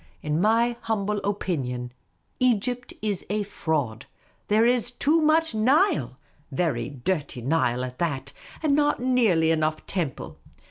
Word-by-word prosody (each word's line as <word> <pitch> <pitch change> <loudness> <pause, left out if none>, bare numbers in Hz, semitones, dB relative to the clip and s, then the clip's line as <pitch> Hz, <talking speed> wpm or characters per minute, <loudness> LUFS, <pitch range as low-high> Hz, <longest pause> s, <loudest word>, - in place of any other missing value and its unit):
In 150 +2 0
my 230 +3 +3
humble 210 -2 -1
opinion, 130 -12 -3 0.5
Egypt 245 0 +1
is 205 -4 -1
a 210 +1 0
fraud; 145 - -2 0.4
there 215 +2 +4
is 245 -1 +3
too 295 +6 +2
much 315 -1 +3
Nile 220 - +2 0.2
— 145 0 -36
very 135 -6 -1
dirty 145 -2 -3
Nile 125 -3 +1
at 125 0 -9
that 140 -5 -2
— - - -18
and 300 -2 +3
not 295 0 +2
nearly 225 -11 +3
enough 155 -1 0
temple. 170 -9 -4
195 Hz, 140 wpm, -25 LUFS, 145-240 Hz, 0.5 s, there